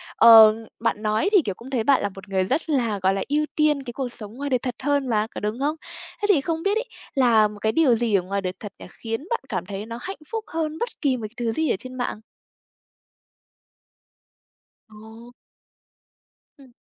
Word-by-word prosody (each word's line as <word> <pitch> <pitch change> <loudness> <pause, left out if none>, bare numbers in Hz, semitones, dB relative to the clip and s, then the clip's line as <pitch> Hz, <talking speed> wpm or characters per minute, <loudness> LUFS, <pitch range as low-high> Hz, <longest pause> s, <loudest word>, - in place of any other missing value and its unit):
ờ, 225 -2 +9 0.2
bạn 230 -2 -1
nói 215 - +1
thì, 400 -4 +6
kiểu, 195 - -3
cũng 240 +6 -12
thấy 250 -4 -1
bạn 275 +3 +3
là 205 - -1
một 195 +1 -11
người 190 -1 +1
rất 280 - -1
là, 235 -8 0
gọi 190 +1 +2
là, 195 - -2
ưu 300 +1 +1
tiên 300 -2 +2
cái 240 -2 -7
cuộc 265 -1 -3
sống 210 -1 -8
ngoài 285 +2 -4
đời 255 - +2
thật 250 -1 -4
hơn 285 -1 +1
mà, 215 -1 +1
có - - -3
đúng 210 +4 -3
không? 295 +3 0 0.5
Thế - - 0
thì 340 -9 +5
không 325 +3 -3
biết 400 +2 +1
ấy, 465 - -2 0.3
là 235 -5 +4
một 210 0 -11
cái 220 +1 +1
điều 275 -3 +4
gì 230 -2 +1
ở 195 - +3
ngoài 195 +2 -3
đời 185 -1 -3
thật 205 -2 -8
nhỉ, - - -10 0.2
khiến 225 +4 -3
bạn 470 - 0
cảm 185 -5 -3
thấy 200 +2 -6
nó 230 +1 -7
hạnh 385 +7 -6
phúc 450 -1 -3
hơn 315 -1 -3
bất 475 - -2
kỳ 270 -4 +1
một 220 -3 -5
thứ 235 -2 -1
gì 315 +7 0
ở - - +2
trên 255 0 -9
mạng? 245 -4 -4 2.7
Ồ! 220 +3 -14 1.2
Ừm. 265 -4 -18
240 Hz, 215 wpm, -23 LUFS, 215-285 Hz, 2.7 s, ờ